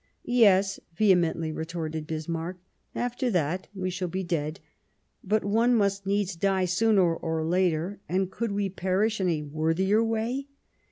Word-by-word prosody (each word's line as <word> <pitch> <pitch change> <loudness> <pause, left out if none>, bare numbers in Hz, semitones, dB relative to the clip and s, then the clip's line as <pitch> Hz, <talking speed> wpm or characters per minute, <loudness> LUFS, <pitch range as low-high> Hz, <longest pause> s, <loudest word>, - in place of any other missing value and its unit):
"Yes," 200 -5 +4 0.2
vehemently 170 -5 +2
retorted 160 -1 -4
Bismarck, 165 +3 -4 0.4
"after 245 +1 -1
that 180 -2 -1
we 185 -1 -2
shall 180 0 -3
be 185 +2 -3
dead; 165 -1 -2 0.6
but 210 +1 +1
one 230 +4 +3
must 200 -2 +1
needs 200 -2 0
die 190 +1 +1
sooner 180 -2 +3
or 160 -1 -2
later, 180 +2 0
and 190 +1 0
could 230 +1 -2
we 200 0 0
perish 190 +3 0
in 185 - +2
a 155 -3 -1
worthier 165 +8 +1
way 230 +5 -1
185 Hz, 145 wpm, -27 LUFS, 165-205 Hz, 0.6 s, Yes